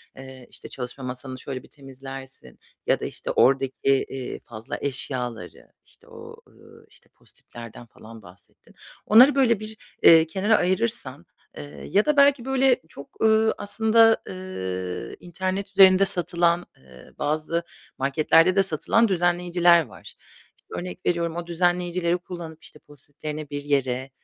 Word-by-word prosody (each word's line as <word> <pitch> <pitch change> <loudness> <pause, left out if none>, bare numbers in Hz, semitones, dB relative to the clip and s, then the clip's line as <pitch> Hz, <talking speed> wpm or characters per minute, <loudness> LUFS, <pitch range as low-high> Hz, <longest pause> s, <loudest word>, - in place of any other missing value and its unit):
Eee, 130 -1 -12
işte, - - -10
çalışma 125 +1 -7
masanı 130 +1 -6
şöyle 130 -1 -7
bir - - -16
temizlersin 135 - -11 0.3
ya - - +2
da, - - -5
işte, - - -5
oradaki, 135 0 +2
eee, 135 -1 -1
fazla 110 -1 -8
eşyaları, 125 -7 -5
işte, - - -23
o, - - -12
ııı, - - -19
işte, - - -20
Post-it'lerden 115 0 -13
falan 110 0 -14
bahsettin. 90 +1 -19 0.3
Onları 255 +7 +7
böyle 235 -6 +3
bir, 215 0 -8 0.3
eee, 165 -1 +7
kenara 200 +6 +1
ayırırsan, 185 - -2 0.3
eee, 145 - -10
ya 205 +2 +2
da 300 -1 +1
belki 280 -3 +4
böyle 265 -1 +3
çok, 140 - -14
ııı, 220 0 +3
aslında, 225 +2 +3
ııı, 95 - -6
internet 185 +3 -4
üzerinde 195 0 +6
satılan, 175 -1 0
ııı, 65 -1 -18
bazı 155 +3 -1 0.3
marketlerde 155 +6 +3
de 195 - +4
satılan 195 +6 +1
düzenleyiciler 175 -2 +2
var. 100 -5 -16 0.5
İşte, - - -29
örnek 180 0 -8
veriyorum 170 -1 -1
o 175 0 -5
düzenleyicileri 175 0 0
kullanıp, 170 -3 -10
işte, 150 - -12
Post-it'lerini 145 +1 -9
bir 145 0 -5
yere 135 -2 -1
165 Hz, 140 wpm, -24 LUFS, 135-190 Hz, 0.5 s, Onları